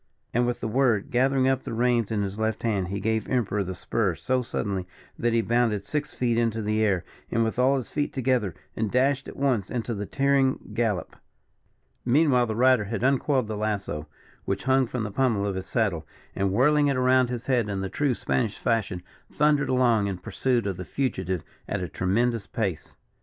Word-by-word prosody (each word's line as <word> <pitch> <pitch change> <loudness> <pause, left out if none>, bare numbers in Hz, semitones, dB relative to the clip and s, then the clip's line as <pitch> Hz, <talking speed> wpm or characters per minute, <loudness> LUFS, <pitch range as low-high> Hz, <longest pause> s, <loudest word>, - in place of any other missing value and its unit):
And, 120 +1 +2
with 120 - -2
the - - -2
word, 120 0 +1
gathering 130 +1 +3
up 135 -1 +2
the - - -5
reins 120 -2 +2
in 105 -2 0
his 100 +2 -4
left 110 0 -1
hand, 100 -6 0
he 100 +2 -3
gave 110 +2 -1
Emperor 105 -5 0
the 95 0 -5
spur 100 -1 -1
so 130 +6 0
suddenly 100 -6 -3 0.3
that 120 - +1
he 115 0 +3
bounded 115 -2 +1
six 150 +9 -3
feet 120 -2 0
into 115 -1 0
the 110 0 0
air, 95 -5 +1 0.2
with 115 +1 0
all 135 +2 +4
his 130 - -5
feet 145 -1 -1
together, 125 - 0 0.2
and 110 -1 -1
dashed 135 +3 +1
at - - -9
once 125 -8 +1
into 120 -1 -2
his 105 -1 -5
tearing 135 -4 +1
gallop. 105 -6 -1 0.9
Meanwhile 125 -1 +3
the 110 - -2
rider 125 -2 +4
had 115 +3 -3
uncoiled 135 -2 +2
the 110 - -3
lasso, 100 -8 -3 0.4
which 100 0 -2
hung 130 0 +3
from 125 -1 -3
the 105 - -4
pummel 115 -4 +1
of 100 - -1
his 95 0 -5
saddle, 95 -9 0 0.3
and 100 0 0
whirling 145 +7 +4
it 140 -2 +1
around 130 -1 +3
his 120 0 -4
head 125 -5 +1
in 100 -1 -2
the 95 - -2
true 140 +5 0
Spanish 115 -2 -1
fashion, 105 -6 -1 0.3
thundered 150 -1 +2
along 120 -5 +3
in 95 -2 -3
pursuit 120 +6 -1
of 95 -3 -2
the 90 - -5
fugitive 95 - -2 0.3
at - - -1
a - - -3
tremendous 105 +7 0
pace. 100 -8 -3
115 Hz, 200 wpm, -26 LUFS, 100-130 Hz, 0.9 s, all